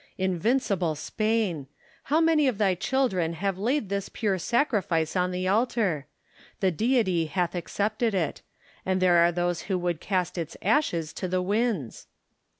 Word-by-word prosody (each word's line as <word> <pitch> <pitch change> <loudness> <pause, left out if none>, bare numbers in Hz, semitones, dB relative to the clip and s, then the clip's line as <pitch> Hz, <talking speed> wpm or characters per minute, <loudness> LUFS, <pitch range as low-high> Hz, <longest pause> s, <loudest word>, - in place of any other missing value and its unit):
Invincible 190 -2 0
Spain! 210 -3 -1 0.4
how 305 +3 +2
many 320 -3 +4
of 250 -6 0
thy 200 -3 +3
children 185 -5 0
have 190 +2 -2
laid 240 +3 0
this 200 -1 -2
pure 200 -5 -1
sacrifice 190 - 0
on 180 0 +2
the 180 0 -2
altar! 205 - +1 0.5
The 190 -2 +2
Deity 190 - +1
hath 180 +1 -1
accepted 210 +5 -1
it: 165 -6 -1 0.4
and 185 0 0
there 180 -2 +4
are 170 0 +5
those 175 0 -1
who 190 - +1
would 175 -2 -2
cast 185 -3 -1
its 165 -2 -5
ashes 180 - +1
to 185 - -4
the 180 0 0
winds 205 - -1
190 Hz, 150 wpm, -26 LUFS, 175-220 Hz, 0.5 s, are